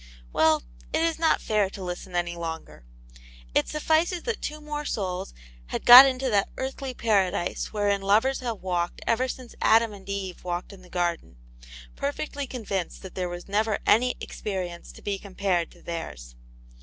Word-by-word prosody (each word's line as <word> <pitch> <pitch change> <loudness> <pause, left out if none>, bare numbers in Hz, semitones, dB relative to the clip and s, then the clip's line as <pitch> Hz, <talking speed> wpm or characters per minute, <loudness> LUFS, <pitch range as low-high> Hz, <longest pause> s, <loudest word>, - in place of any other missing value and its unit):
Well, 160 0 +4 0.3
it 325 - +2
is 330 -1 0
not 325 -1 +3
fair 210 -3 +2
to 195 0 -8
listen 180 0 -6
any 175 0 0
longer. 165 - -6 0.7
It - - +2
sufficeat 320 +3 +1
that 460 -1 -2
two 305 +1 -4
more 300 0 -5
souls 185 - -3 0.4
had - - -4
got 250 +3 +12
into 260 0 -1
that 200 -1 +2
earthly 265 0 -4
para 205 -6 +3
dise 175 -2 -3
wherein 205 -1 +1
lovers 220 +7 +3
have 235 -6 -4
walked 175 -2 -2
ever 245 +3 +2
since 255 -1 -7
Adam 225 -1 +4
and 200 -1 -12
Eve 195 -2 -4
walked 175 +2 -4
in 195 - -13
the 180 - -16
garden, 170 - -2 0.6
perfectly 280 - -3
convinced 200 -8 -4
that 190 - -9
there 180 -1 -2 0.2
never 215 +3 +1
was - - -1
any 250 +4 +4
experience 180 -4 -5
to - - -15
be 200 -1 -2
compared 190 -4 -1
to - - -19
tlieirs. 70 - -6
200 Hz, 170 wpm, -26 LUFS, 180-255 Hz, 0.7 s, got